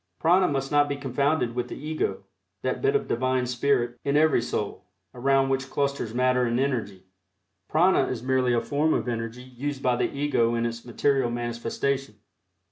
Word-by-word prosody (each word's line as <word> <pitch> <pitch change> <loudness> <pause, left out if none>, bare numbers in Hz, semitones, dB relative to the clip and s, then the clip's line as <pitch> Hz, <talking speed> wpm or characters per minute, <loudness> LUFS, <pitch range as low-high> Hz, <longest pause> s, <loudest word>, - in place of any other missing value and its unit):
Prana 180 +3 +4
must 135 -2 -2
not 145 0 +3
be 140 - -1
confounded 140 -1 0
with 125 0 -2
the - - -7
Ego 155 +2 -3 0.4
that - - -1
bit 415 0 +2
of 425 - 0
Divine 130 +1 0
Spirit 120 -1 0
in 140 +1 +1
every 155 -5 +4
soul, 105 -5 -4 0.3
around 135 +2 +2
which 135 0 -1
clusters 140 -5 -1
matter 125 +1 +2
and 120 0 0
energy. 110 -9 -2 0.7
Prana 165 -2 +3
is 120 -2 -4
merely 130 -1 +2
a 120 - +2
form 150 +2 +1
of - - -2
energy 115 +1 -4
used 130 +2 -5
by 125 -1 +3
the - - 0
Ego 140 -5 +1
in 115 0 0
its 115 0 -4
material 130 +1 +1
manifestation. 120 +2 -2
130 Hz, 175 wpm, -26 LUFS, 120-140 Hz, 0.7 s, Prana